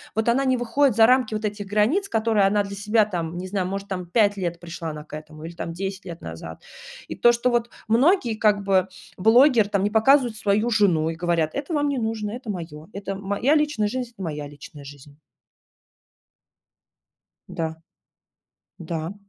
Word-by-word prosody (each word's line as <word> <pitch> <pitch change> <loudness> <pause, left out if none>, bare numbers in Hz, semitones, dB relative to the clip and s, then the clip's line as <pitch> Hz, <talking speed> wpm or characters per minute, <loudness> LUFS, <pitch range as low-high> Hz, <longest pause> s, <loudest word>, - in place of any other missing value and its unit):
Вот 220 +1 0
она 245 +4 +3
не 260 -1 +2
выходит 245 +1 +1
за 225 - +8
рамки 250 -2 +3
вот 215 0 -3
этих 205 -1 -4
границ, 215 - +1
которые 220 -3 +2
она 205 +1 +2
для 200 0 -7
себя, 210 +2 +2
там, 175 -4 -4
не 185 - -5
знаю, 185 -1 -2
может, 195 +1 -5
там 185 -2 -4
5 205 +3 +2
лет 175 -2 -3
пришла 165 -1 -6
она 150 -1 -7
к 150 - -9
этому 155 0 -10
или 170 - -7
там 165 - -5
10 190 +3 -5
лет 170 -2 -8
назад. 80 0 -8 0.5
И - - -6
то, 240 - +5
что 235 +1 0
вот 240 0 0 0.2
многие 245 - +3
как 210 -2 +2
бы 190 -1 +2 0.3
блогер 225 +2 +5
там 200 -2 0
не 205 - +1
показывают 240 +2 +4
свою 210 +3 +1
жену 180 -8 +2
и 165 - -4
говорят: 170 -2 0
"Это 285 +4 -4
вам 290 -1 +1
не 280 -2 -1
нужно, 220 -2 -3
это 245 -1 -8
моё, 165 -5 -6
это 195 0 -5
моя 200 +9 0
личная 295 -9 +1
жизнь, 250 +1 -4
это 220 - -14
моя 150 -3 -4
личная 145 0 -12
жизнь". 140 +1 -13 2.3
Да, 160 -1 -4 1.0
да. 165 +1 -4
205 Hz, 185 wpm, -23 LUFS, 170-230 Hz, 2.3 s, за